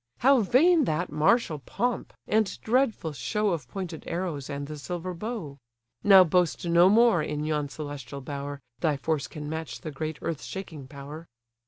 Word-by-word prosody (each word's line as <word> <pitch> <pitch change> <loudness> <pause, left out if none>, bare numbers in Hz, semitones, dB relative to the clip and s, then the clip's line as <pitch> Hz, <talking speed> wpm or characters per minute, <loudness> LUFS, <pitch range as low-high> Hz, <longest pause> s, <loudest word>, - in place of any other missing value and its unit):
How 270 +1 +6
vain 305 - +4
that 170 +1 -1
martial 155 +2 +2
pomp, 240 - -2
and 215 -2 +1
dreadful 225 - +1
show 205 - -1
Of 155 -8 -3
pointed 175 +2 -6
arrows 165 -6 -3
and 140 0 -4
the 150 +1 -7
silver 180 +4 -4
bow! 175 - -5 0.4
Now 195 -2 +9
boast 180 0 +1
no 170 +2 +6
more 225 -4 +5
in 150 0 -3
yon 150 -2 -1
celestial 140 -3 -7
bower, 140 +1 -6 0.2
Thy 150 -1 +1
force 140 -2 -1
can 150 +2 -7
match 160 +1 -5
the 155 - -5
great 155 +2 -4
earth 165 -3 -3
shaking 160 -8 -7
power." 145 +4 -9
160 Hz, 165 wpm, -27 LUFS, 145-190 Hz, 0.4 s, Now